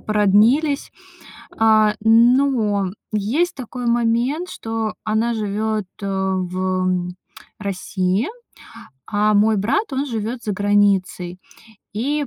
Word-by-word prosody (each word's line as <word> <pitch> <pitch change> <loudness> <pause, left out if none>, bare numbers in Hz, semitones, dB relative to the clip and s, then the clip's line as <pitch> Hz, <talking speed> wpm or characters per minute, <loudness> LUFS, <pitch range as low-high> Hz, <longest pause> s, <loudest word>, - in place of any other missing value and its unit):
породнились. 215 +8 +2 0.7
А, 215 -1 +4
но 225 -2 +3 0.3
есть 235 - 0
такой 250 -1 -6
момент, 240 +8 +1
что 225 -1 -4
она 220 +2 0
живёт, 215 0 -2 0.2
э, - - -3
в 185 -1 -1 0.5
России, 195 +2 -1 0.8
а 210 0 +1
мой 215 +1 +4
брат, 270 - 0
он 275 +2 -1
живёт 230 0 -4
за 210 - -2
границей. 195 -3 +1 0.6
И 285 +7 -1
215 Hz, 100 wpm, -20 LUFS, 200-240 Hz, 0.8 s, А